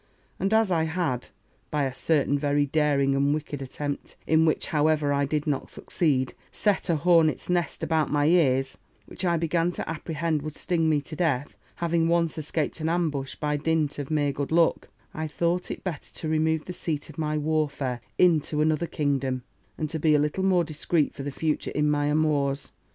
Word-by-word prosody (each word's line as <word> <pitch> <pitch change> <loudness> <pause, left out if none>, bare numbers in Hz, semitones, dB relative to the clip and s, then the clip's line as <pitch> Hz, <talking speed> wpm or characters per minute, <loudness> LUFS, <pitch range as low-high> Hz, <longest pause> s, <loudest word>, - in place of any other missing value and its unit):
And 195 - 0
as 220 -3 +3
I 160 -2 +2
had, 160 -7 -2 0.4
by 150 -1 0
a 135 -1 -1
certain 145 +1 +1
very 145 0 +2
daring 140 -2 +2
and 140 +2 +2
wicked 150 -2 -5
attempt, 145 +2 -5
in 160 0 +4
which, 155 - +1
however, 150 -1 +2
I 140 0 +2
did 150 +1 -1
not 145 -3 -2
succeed, 135 -7 0 0.2
set 205 -2 0
a 170 - +3
hornet's 165 +1 +3
nest 175 -1 -1
about 160 -2 +1
my 145 0 +2
ears, 135 -6 +2 0.3
which - - -7
I 170 -2 +2
began 165 +1 +1
to - - -5
apprehend 160 -1 -2
would 155 0 -6
sting 165 -3 0
me 150 -2 +2
to 155 +2 -8
death, 150 -5 0 0.2
having 170 -1 +1
once 170 -1 +2
escaped 155 +2 -2
an 160 0 -1
ambush 155 -6 -1
by 150 -1 -1
dint 150 -1 0
of 140 - -5
mere 145 -2 +1
good 140 +1 -4
luck; 165 0 +2 0.2
I 155 0 -3
thought 170 +3 -1
it - - -6
better 170 -6 -5
to 160 - -4
remove 160 0 +1
the 180 - -6
seat 155 -4 -3
of 155 - -11
my 155 -1 0
warfare 145 -5 -1 0.2
into 160 -4 +3
another 155 +2 +2
kingdom, 135 -4 -1 0.3
and 155 - -2
to 160 - -3
be 155 0 +4
a - - +4
little 150 +6 0
more 185 -2 +3
discreet 155 0 0
for - - -8
the 140 - -3
future 155 +2 -1
in 150 0 +1
my 145 0 +1
amours. 145 -2 +1
155 Hz, 195 wpm, -26 LUFS, 145-165 Hz, 0.4 s, in